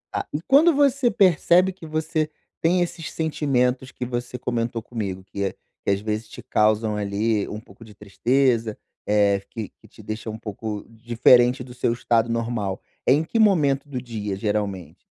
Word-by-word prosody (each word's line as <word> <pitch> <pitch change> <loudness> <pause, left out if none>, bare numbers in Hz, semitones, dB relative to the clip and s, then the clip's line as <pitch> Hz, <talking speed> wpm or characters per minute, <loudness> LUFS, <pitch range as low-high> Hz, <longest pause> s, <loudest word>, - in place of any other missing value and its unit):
Ah, - - -2
e 150 - -2
quando 300 - +5
você 275 -3 +3
percebe 185 -2 +4
que 165 -4 -11
você 155 0 -1 0.3
tem 175 +2 +3
esses 170 -2 -3
sentimentos 130 -5 0
que 125 - -5
você 120 0 -4
comentou 120 -2 -2
comigo, 100 -5 -5
que 100 +1 -4
a 95 - -2 0.3
que - - 0
às 100 - +1
vezes 110 +1 -3
te - - -10
causam, 110 0 +1
ali, 105 +1 0
um 105 - -5
pouco 105 0 -16
de 110 -2 -14
tristeza, 115 +2 +1 0.3
eh, 100 -1 +3
que 110 -4 -6
que - - -17
te - - -16
deixa 110 +1 -5
um 110 - -5
pouco 105 -1 -6
diferente 120 +2 +3
do 125 0 -9
seu 120 - 0
estado 115 -1 +1
normal. 115 -4 -2 0.3
É - - +4
em 150 +4 +4
que 225 - -3
momento 150 -10 +3
do 130 -3 -4
dia, 105 -5 -4
geralmente? 100 -3 -3
120 Hz, 180 wpm, -23 LUFS, 105-145 Hz, 0.3 s, quando